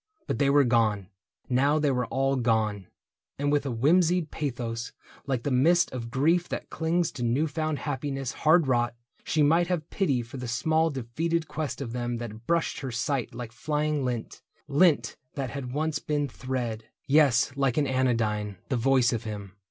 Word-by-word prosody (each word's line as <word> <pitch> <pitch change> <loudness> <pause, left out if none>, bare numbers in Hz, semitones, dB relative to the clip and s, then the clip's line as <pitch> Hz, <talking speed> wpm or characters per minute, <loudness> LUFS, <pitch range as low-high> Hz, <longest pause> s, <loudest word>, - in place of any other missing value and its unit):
But - - -2
they 140 -1 +3
were 145 0 +5
gone 110 -6 +1 0.2
— - - -66
now 140 +4 +3
they 150 -2 +2
were 125 -2 0
all 135 +1 +1
gone; 110 -6 0 0.5
And 145 +1 0
with 145 -1 +1
a - - -1
whimsied 165 +6 +2
pathos, 120 -5 -4 0.3
like 130 -4 -1
the 145 - -1
mist 165 +8 +4
Of 120 -2 -5
grief 165 +8 +2
that - - -5
clings 165 +1 0
to 120 - -5
new 120 +6 +2
found 155 0 -2
happiness 135 -2 -3
Hard 160 +1 +4
wrought, 120 -2 +1 0.3
she 155 - +1
might 165 +4 +4
have 175 -5 -2
pity 140 -11 +1
for 125 +4 -9
the 125 -1 -5
small 160 +7 +1
Defeated 155 +5 -2
quest 150 -3 -4
of 120 -4 -5
them 120 -1 -2
that 115 -1 -8
brushed 170 -1 +1
her 135 - -4
sight 120 +1 -2
Like 120 -2 -6
flying 150 +3 -1
lint 120 -3 -4 0.2
— - - -35
lint 145 -5 +3 0.2
that 135 -4 -3
had 135 -3 -5
once 150 +2 -1
been 150 -1 -1
thread.... 120 -4 -4 0.2
Yes, 135 -3 +4
like 135 -3 +1
an 150 - +3
anodyne, 115 -6 0
the 130 - +1
voice 130 0 +3
of 115 -1 -3
him. 105 -3 -6
135 Hz, 185 wpm, -27 LUFS, 120-150 Hz, 0.5 s, were